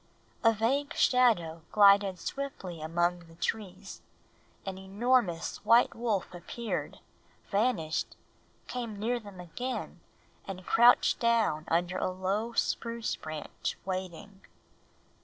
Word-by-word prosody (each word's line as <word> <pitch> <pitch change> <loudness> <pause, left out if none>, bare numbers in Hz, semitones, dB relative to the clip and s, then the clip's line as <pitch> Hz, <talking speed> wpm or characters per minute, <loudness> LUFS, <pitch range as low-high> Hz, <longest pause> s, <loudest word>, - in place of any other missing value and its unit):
A 225 - +7
vague 255 +7 0
shadow 210 -11 +3
glided 200 -2 +6
swiftly 185 - -5
among 175 +2 0
the 165 - -16
trees. 195 +1 -4 0.6
An 190 -1 -5
enormous 200 -2 +1
white 230 +3 +5
wolf 220 -6 -2
appeared, 215 +6 -4 0.5
vanished, 200 -7 0 0.5
came 235 -4 -5
near 235 +4 -1
them 205 -4 -12
again, 245 +9 -5 0.5
and 185 -2 -7
crouched 240 +1 +5
down 225 -10 +2
under 175 +2 0
a - - 0
low 195 +5 -2
spruce 230 0 -1
branch 155 -1 -5
waiting. 190 +1 -5
200 Hz, 105 wpm, -30 LUFS, 175-235 Hz, 0.6 s, A